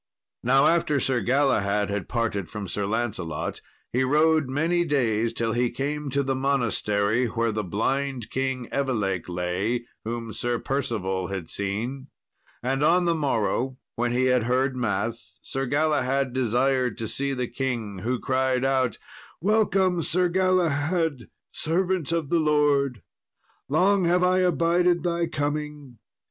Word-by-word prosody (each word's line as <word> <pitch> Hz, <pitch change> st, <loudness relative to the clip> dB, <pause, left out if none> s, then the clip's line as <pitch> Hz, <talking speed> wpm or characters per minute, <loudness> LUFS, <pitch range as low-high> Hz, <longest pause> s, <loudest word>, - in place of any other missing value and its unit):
Now 135 Hz, +3 st, +4 dB
after 165 Hz, -4 st, +3 dB
Sir 130 Hz, -2 st, +1 dB
Galahad 105 Hz, -5 st, +1 dB
had 100 Hz, -1 st, -3 dB
parted 110 Hz, -6 st, -1 dB
from 105 Hz, -2 st, -6 dB
Sir 100 Hz, +2 st, -2 dB
Lancelot, 100 Hz, -8 st, -3 dB, 0.3 s
he 130 Hz, +2 st, +2 dB
rode 155 Hz, +1 st, +3 dB
many 165 Hz, +6 st, +1 dB
days, 115 Hz, -8 st, +1 dB
till 115 Hz, -1 st, -1 dB
he 120 Hz, +1 st, +1 dB
came 145 Hz, +4 st, -3 dB
to 140 Hz, +1 st, 0 dB
the 135 Hz, 0 st, 0 dB
monastery 120 Hz, -4 st, +1 dB
where 115 Hz, +1 st, 0 dB
the 110 Hz, 0 st, -2 dB
blind 125 Hz, +5 st, -2 dB
King 130 Hz, -2 st, -2 dB
Evelake 105 Hz, -11 st, -1 dB
lay, 90 Hz, +7 st, -1 dB, 0.2 s
whom 115 Hz, 0 st, -4 dB
Sir 120 Hz, 0 st, -1 dB
Percival 105 Hz, -9 st, -2 dB
had 95 Hz, -4 st, -5 dB
seen. 115 Hz, +8 st, -3 dB, 0.6 s
And 135 Hz, +2 st, 0 dB
on 175 Hz, +3 st, +4 dB
the 170 Hz, -, +3 dB
morrow, 130 Hz, -3 st, 0 dB, 0.2 s
when 120 Hz, +1 st, 0 dB
he 125 Hz, +1 st, +2 dB
had 125 Hz, -3 st, +3 dB
heard 130 Hz, +2 st, +1 dB
mass, 110 Hz, -4 st, -3 dB
Sir 135 Hz, 0 st, -2 dB
Galahad 140 Hz, -2 st, +1 dB
desired 130 Hz, 0 st, +1 dB
to 115 Hz, -2 st, -3 dB
see 140 Hz, +5 st, -1 dB
the 125 Hz, -2 st, -2 dB
king, 120 Hz, -6 st, -3 dB
who 125 Hz, +6 st, -1 dB
cried 130 Hz, -1 st, +1 dB
out, 130 Hz, -4 st, +1 dB, 0.4 s
"Welcome, 190 Hz, -2 st, +2 dB
Sir 180 Hz, +3 st, +1 dB
Galahad, 170 Hz, -5 st, +1 dB, 0.2 s
servant 175 Hz, 0 st, 0 dB
of 165 Hz, -4 st, -1 dB
the 170 Hz, -, +4 dB
Lord! 145 Hz, -, +2 dB, 0.7 s
long 185 Hz, +5 st, +3 dB
have 180 Hz, +1 st, +3 dB
I 185 Hz, +1 st, +3 dB
abided 175 Hz, 0 st, +2 dB
thy 170 Hz, -1 st, 0 dB
coming. 145 Hz, -4 st, -4 dB
130 Hz, 140 wpm, -25 LUFS, 115-150 Hz, 0.7 s, Now